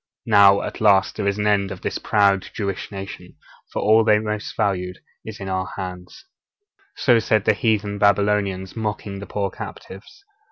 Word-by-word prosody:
Now, 100 -2 +5
at - - -6
last, 100 -2 +4
there 100 - -2
is 100 0 0
an 105 - -1
end 100 -2 +2
of 95 - -8
this - - -3
proud 100 -2 +2
Jewish 100 -2 -4
nation, 95 -1 -8 0.4
for - - -3
all 110 +2 +5
that 110 -1 +4
they - - +5
most 105 0 -4
valued 90 -2 -1 0.3
is 110 -1 -9
in 95 - -6
our 95 -1 -2
hands.' 90 - -8 0.7
So 120 -3 +3
said 110 -2 +1
the - - +4
heathen 105 -2 -1
Babylonians, 100 -2 +1
mocking 105 -3 -4
the 100 - -8
poor 100 -2 -2
captives. 110 - -10
100 Hz, 175 wpm, -22 LUFS, 95-105 Hz, 0.7 s, Now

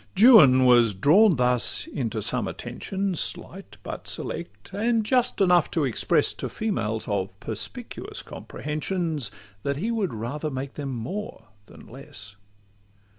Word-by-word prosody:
Juan 170 - +8
was 120 -4 +5
drawn 175 - +5
thus 125 -1 +2
into 115 -5 -3
some - - -1
attentions, 195 -3 -4
Slight - - -4
but - - -7
select, 100 - -5
and 225 +2 +1
just 250 0 +1
enough 180 -4 +4
to 160 -4 0
express, 125 - +2
To - - -5
females 110 - -2
of 100 -1 -3
perspicuous - - -6
comprehensions, 155 - -4 0.3
That 140 +3 -2
he 215 +10 -2
would 210 - -1
rather 140 +8 -4
make 135 0 -5
them 145 -2 -5
more 125 - -6 0.2
than - - -15
less. 135 -5 -9
145 Hz, 130 wpm, -25 LUFS, 120-195 Hz, 0.3 s, Juan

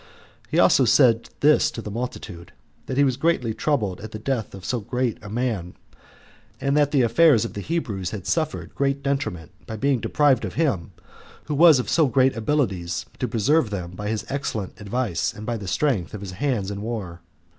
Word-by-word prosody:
He - - -1
also - - +5
said 115 -2 +4
this 150 +1 +5
to - - -8
the 105 -2 -6
multitude, 100 -7 -6 0.3
that 130 - -3
he 140 - +5
was 130 -3 +1
greatly 140 -7 +1
troubled 110 -10 -1
at 110 - -7
the 110 - -7
death 115 -2 -3
of 95 - -10
so 125 - -1
good 125 +2 -2
a 105 - -9
man; 110 -6 -2 0.8
and 140 0 0
that 145 -1 +3
the 140 -3 +3
affairs 120 -1 +4
of - - -6
the 100 - -5
Hebrews 105 - -2
had 100 -5 -7
suffered 95 - -2
great 140 0 -1
detriment 135 - -2 0.2
by 110 - -5
being 135 +2 +1
deprived 145 -3 +2
of - - -5
him, 135 - 0 0.5
who 150 - -3
was 160 0 +7
of 125 - -2
so 160 -3 +3
great 130 +1 +3
abilities 110 - -1
to 125 - -1
preserve 120 +4 +2
them 90 -4 -5
by 105 +3 -6
his 110 -1 -2
excellent 110 -8 -4
advice, 105 -4 -1
and 105 - -8
by 120 - -2
the 100 -4 -6
strength 110 - 0
of 105 - -7
his 100 -2 -6
hands 105 -1 -1
in 100 0 -5
war. 100 -7 -5
115 Hz, 200 wpm, -23 LUFS, 100-140 Hz, 0.8 s, was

